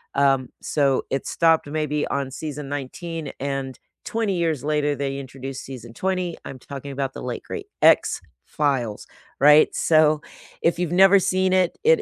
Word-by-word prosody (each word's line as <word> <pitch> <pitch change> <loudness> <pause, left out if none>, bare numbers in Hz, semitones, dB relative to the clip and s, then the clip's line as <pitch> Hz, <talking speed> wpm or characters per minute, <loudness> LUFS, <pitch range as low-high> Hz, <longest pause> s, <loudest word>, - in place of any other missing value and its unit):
um, 135 -2 +2
so 140 -3 +1
it 135 - -2
stopped 165 -1 +3
maybe 150 0 -1
on 140 -1 -2
season 150 -1 -6
19, 150 +3 -5
and 135 -1 -4 0.3
20 220 -4 -1
years 160 -5 0
later, 150 -1 +1
they 135 0 -3
introduced 135 0 -7
season 120 -3 -9
20. 185 +1 -2
I'm 130 - -8
talking 140 +1 -8
about 135 -1 -3
the - - -8
late - - -4
great 415 -2 -7
X-Files, 130 -8 +1 0.3
right? 150 +2 +6
So, 155 -1 +4 0.4
if 170 - +2
you've 175 -2 -1
never 195 +2 +6
seen 185 0 +1
it, 185 -2 +2
it 480 -1 +5
150 Hz, 155 wpm, -23 LUFS, 135-170 Hz, 0.4 s, right